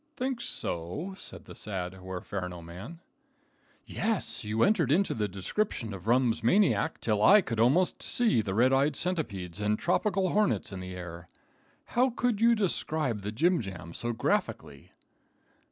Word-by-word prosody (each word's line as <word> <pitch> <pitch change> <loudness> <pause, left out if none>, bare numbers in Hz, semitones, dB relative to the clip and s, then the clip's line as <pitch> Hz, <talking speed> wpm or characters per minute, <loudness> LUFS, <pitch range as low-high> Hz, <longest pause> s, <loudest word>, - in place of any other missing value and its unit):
"Think 255 -1 -2
so?" 150 - -4
said - - -8
the - - -10
sad 95 -3 -4
Huerferno 90 -1 -6
man. 95 - -9 0.8
"Yes, 215 - -2
you 110 +2 +1
entered 175 - +3
into 195 +6 +3
the 105 -3 -1
description 105 - -2
of 95 +1 -9
rum's 120 -1 +2
maniac 165 - +3
till 105 -2 0
I 205 - +8
could 115 -10 -4
almost 145 +11 +3
see 230 - +2
the 95 -2 -3
red 125 +4 +4
eyed 140 +2 +3
centipedes 105 - -3
and 105 +1 +1
tropical 190 - +1
hornets 210 - +1
in 95 - -6
the 90 0 -7
air. 85 -1 -8 0.7
How 250 +2 +4
could 240 -3 -1
you 235 0 +6
describe 155 - -1
the 105 +1 -4
jimjams 100 - -1
so 120 - -1
graphically?" 70 -10 -2
120 Hz, 150 wpm, -29 LUFS, -, 0.8 s, I